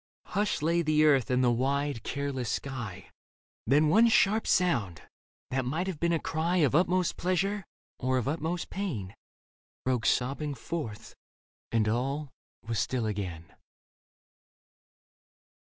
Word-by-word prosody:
Hushed 205 -6 0
lay 170 +2 +2
the 155 -1 +3
earth 140 -4 +4
and 125 0 +2
the 120 - +4
wide, 140 +1 0
careless 140 -3 -3
sky. 110 -6 -5 0.6
Then 145 +5 +4
one 220 +9 +6
sharp 220 -1 +3
sound, 115 - +1 0.5
that 130 0 0
might 155 +9 -1
have 185 -6 -4
been 170 0 +1
a 165 - +3
cry 165 +3 -1
Of 145 -7 +3
utmost 180 +2 +2
pleasure 195 +3 0 0.4
or 130 0 +1
of 125 - -1
utmost 165 +4 -2
pain. 125 - -4 0.7
Broke 125 -3 +1
sobbing 140 +3 0
forth, 115 -5 -6 0.6
and 110 -2 +2
all 135 +5 -1 0.3
was 115 -2 -2
still 115 +3 0
again. 95 -6 -4
140 Hz, 130 wpm, -29 LUFS, 120-170 Hz, 0.7 s, one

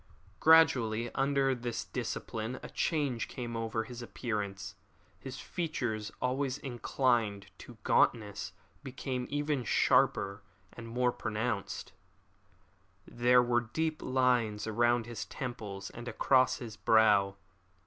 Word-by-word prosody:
Gradually 120 -8 +4
under 135 0 +2
this 120 -2 -4
discipline 115 +3 -4
a - - -7
change 140 -8 0
came 120 -2 -6
over 115 0 -2
his 125 +1 -9
appearance. 100 -4 -4 0.5
His - - -8
features, 120 -11 -3
always 130 +1 -1
inclined 120 -6 0
to - - -12
gauntness, 105 -5 +1 0.3
became 130 -1 -4
even 145 -2 -1
sharper 100 -2 +2 0.3
and 115 -1 -9
more 125 +2 +1
pronounced. 110 -2 -3 1.1
There 125 +1 +4
were 120 0 +2
deep 155 +7 -2
lines 125 -5 +1
about 120 +1 +2
his 120 -2 -5
temples 105 -7 -6
and 120 +1 -9
across 130 +1 +3
his 115 -3 -8
brow. 105 -3 +4
120 Hz, 110 wpm, -31 LUFS, 110-130 Hz, 1.1 s, Gradually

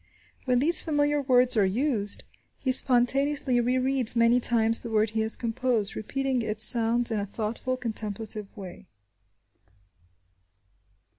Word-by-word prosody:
When 250 -2 0
these 310 +7 +4
familiar 290 -2 -1
words 250 -2 +2
are 210 - +2
used, 210 +1 -1 0.3
he 260 - -3
spontaneously 265 +1 +3
rereads 255 0 +1
many 230 +1 +2
times 230 -2 +2
the 235 - -9
word 215 -1 -1
he 220 - -4
has 220 0 -3
composed, 230 -2 -3
repeating 265 +3 -3
its 215 0 -2
sounds 235 +1 +2
in 220 - -2
a 200 - -4
thoughtful, 225 +5 -5
contemplative 215 -2 -5
way. 190 -1 -11
240 Hz, 130 wpm, -25 LUFS, 220-255 Hz, 0.3 s, these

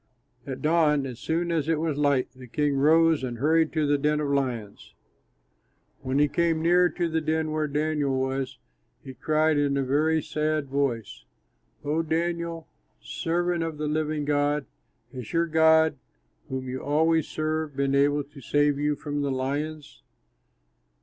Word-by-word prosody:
At 135 +1 -6
dawn, 150 -3 +3
as 125 -3 -7
soon 170 +2 -1
as 160 -2 -1
it 160 -2 +1
was 160 -2 -1
light, 145 -3 +1
the 130 -1 -12
king 145 +3 0
rose 160 +2 +4
and 120 -2 -4
hurried 160 +4 +2
to 155 -2 +1
the 145 0 +2
den 150 +1 +1
of 150 -2 -2
lions. 125 -7 -3 1.1
When 130 +1 -2
he 150 +1 +4
came 165 +2 +1
near 175 +2 +4
to 175 +1 -2
the 160 0 -1
den 155 0 -1
where 155 0 -1
Daniel 145 -2 0
was, 130 -1 -2 0.5
he 130 - -9
cried 155 +4 +1
with 140 -1 +1
a 135 - +1
very 155 +4 +2
sad 155 -2 -1
voice, 130 -6 -2 0.6
"O 155 +3 +1
Daniel, 170 0 -2 0.3
servant 175 +1 -1
of 165 -2 -3
the 150 - -3
living 150 0 -1
God, 145 0 +1 0.5
has 125 -4 -7
your 170 0 +2
God, 160 -2 +4 0.5
whom 130 0 -4
you 130 +1 -4
always 160 +3 +2
serve, 155 -1 -3
been 140 0 0
able 145 +1 +2
to 140 0 -15
save 145 +2 +1
you 150 0 +1
from 145 0 -4
the 140 - -1
lions?" 145 +3 -4
150 Hz, 165 wpm, -26 LUFS, 140-160 Hz, 1.1 s, rose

